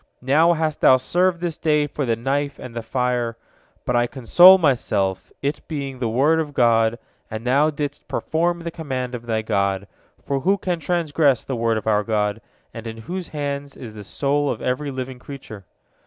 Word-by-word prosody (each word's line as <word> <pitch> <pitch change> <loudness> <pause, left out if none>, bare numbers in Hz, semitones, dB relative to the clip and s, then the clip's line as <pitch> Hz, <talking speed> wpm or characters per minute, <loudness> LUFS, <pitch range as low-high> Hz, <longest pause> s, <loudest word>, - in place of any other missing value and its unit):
Now 155 +6 +4
hast 155 -2 -2
thou 130 - +7
served 175 +6 +1
this 170 -3 -3
day 150 -2 +2
for 145 -2 -4
the 115 - +2
knife 140 +4 -2
and 125 -2 -9
the 115 - -3
fire. 120 -1 -1 0.5
But 125 - 0
I 120 0 +3
console 175 +10 +7
myself, 115 - 0
it 145 +2 -1
being 140 -4 -5
the 120 -3 -1
word 145 +8 +3
of 150 -3 -4
God, 115 -1 +3 0.3
and 110 +2 -6
thou 140 +5 +3
didst 145 -1 -5
perform 170 +2 -1
the 170 0 -5
command 130 -6 -4
of 120 -1 -7
thy 110 -1 -1
God, 100 -2 0 0.3
for 140 -1 -2
who 195 +9 +2
can 180 -3 -2
transgress 155 -5 +1
the 135 - -3
word 115 -1 +1
of 110 - -5
our 105 -1 +2
God, 105 -2 -1 0.3
in 115 0 -7
whose 175 +11 -6
hands 140 -1 -4
is 115 -4 -9
the 105 -1 -9
soul 145 +6 0
of - - -2
every 130 +3 -2
living 130 -1 -6
creature? 125 -7 -10
135 Hz, 185 wpm, -22 LUFS, 115-150 Hz, 0.5 s, thou